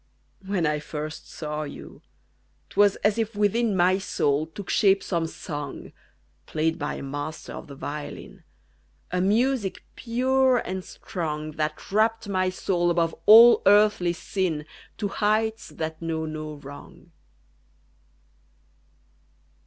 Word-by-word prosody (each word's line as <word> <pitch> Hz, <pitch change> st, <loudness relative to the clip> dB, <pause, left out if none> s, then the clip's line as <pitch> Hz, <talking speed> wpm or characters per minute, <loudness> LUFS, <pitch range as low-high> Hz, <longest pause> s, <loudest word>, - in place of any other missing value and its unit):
When 170 Hz, -6 st, 0 dB
first 150 Hz, +1 st, -6 dB
I -, -, -18 dB
saw 150 Hz, -1 st, -5 dB
you, 145 Hz, -2 st, -9 dB, 0.7 s
't -, -, -15 dB
was 205 Hz, -1 st, +5 dB
as 210 Hz, +2 st, +3 dB
if 225 Hz, -1 st, -2 dB
within 210 Hz, +1 st, +1 dB
My 185 Hz, +2 st, +4 dB
soul 150 Hz, -5 st, 0 dB
took 185 Hz, +4 st, -9 dB
shape 195 Hz, -2 st, +3 dB
some 170 Hz, -3 st, -1 dB
song 145 Hz, -3 st, -7 dB, 0.6 s
Played 160 Hz, +1 st, -1 dB
by 145 Hz, -, -3 dB
a -, -, -7 dB
master 145 Hz, +3 st, -6 dB
of -, -, -8 dB
the 140 Hz, -, -10 dB
violin 145 Hz, +1 st, -7 dB, 0.7 s
A 180 Hz, 0 st, 0 dB
music 220 Hz, +1 st, +1 dB
pure 260 Hz, +2 st, +2 dB
and 190 Hz, -4 st, -3 dB
strong, 155 Hz, -5 st, -5 dB
That 155 Hz, +2 st, -4 dB
rapt 220 Hz, +1 st, +2 dB
my 185 Hz, -2 st, +1 dB
soul 180 Hz, -1 st, 0 dB
above 165 Hz, -1 st, +1 dB
all 230 Hz, +3 st, +9 dB
earthly 205 Hz, -4 st, +5 dB
sin 170 Hz, -3 st, -2 dB, 0.3 s
To 210 Hz, -, -1 dB
heights 220 Hz, +2 st, 0 dB
that 160 Hz, 0 st, -5 dB
know 160 Hz, -1 st, -2 dB
no 155 Hz, -1 st, -6 dB
wrong. 145 Hz, 0 st, -12 dB
180 Hz, 130 wpm, -25 LUFS, 155-210 Hz, 0.7 s, all